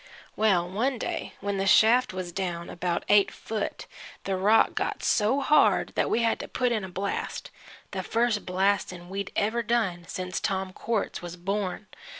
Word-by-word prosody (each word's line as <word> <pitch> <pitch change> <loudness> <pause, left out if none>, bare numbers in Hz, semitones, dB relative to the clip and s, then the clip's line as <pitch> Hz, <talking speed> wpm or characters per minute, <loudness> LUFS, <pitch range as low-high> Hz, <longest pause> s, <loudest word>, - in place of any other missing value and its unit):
Well, 190 -5 +2
one 240 +8 -1
day - - -4
when 200 0 -2
the 195 - 0
shaft 230 +6 +5
was 185 -1 -5
down 175 -2 -4
about 175 -1 -2
eight 205 -1 +5
foot, 215 -2 -5 0.4
the 195 - -1
rock 205 +4 +4
got - - -2
so 230 +6 +2
hard 300 +2 +4
that - - 0
we 235 - +1
had 230 - +1
to - - -6
put 250 -1 0
in 220 -4 0
a 190 - -6
blast 195 +2 -4 0.4
the - - -3
first 230 -2 0
blast'n' 185 -1 0
we'd 195 +1 -4
ever 220 +3 +1
done 210 -7 -1
since 185 0 -4
Tom 190 -1 -2
Quartz 225 0 -2
was 175 0 -7
born. 195 +2 -3
200 Hz, 170 wpm, -27 LUFS, 185-220 Hz, 0.4 s, shaft